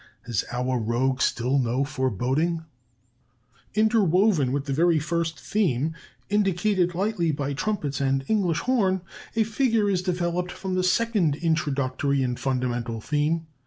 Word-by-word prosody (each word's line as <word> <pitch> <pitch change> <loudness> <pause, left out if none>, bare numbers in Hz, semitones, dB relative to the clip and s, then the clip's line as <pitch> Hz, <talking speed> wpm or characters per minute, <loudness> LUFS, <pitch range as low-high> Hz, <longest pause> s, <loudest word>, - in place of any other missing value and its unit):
Has 115 -4 -1
our 125 +1 -1
rogue 125 +4 0
still 130 +4 +1
no 125 +2 +1
foreboding? 135 - -1 1.1
"Interwoven 200 - +3
with 140 +1 -1
the 140 - -2
very 165 +3 +3
first 165 0 -2
theme, 160 - 0 0.3
indicated 195 -3 +1
lightly 190 -3 0
by 140 -1 -2
trumpets 150 -5 -2
and 135 0 +1
English 185 -7 +1
horn, 195 -8 +1 0.3
a 225 - +3
figure 225 -1 +1
is 185 -2 +1
developed 180 -1 -1
from 190 -1 -5
the 185 0 +1
second 185 -5 +2
introductory 140 -4 0
and 125 -1 -2
fundamental 120 -3 -2
theme. 150 +6 0
160 Hz, 130 wpm, -25 LUFS, 135-185 Hz, 1.1 s, Interwoven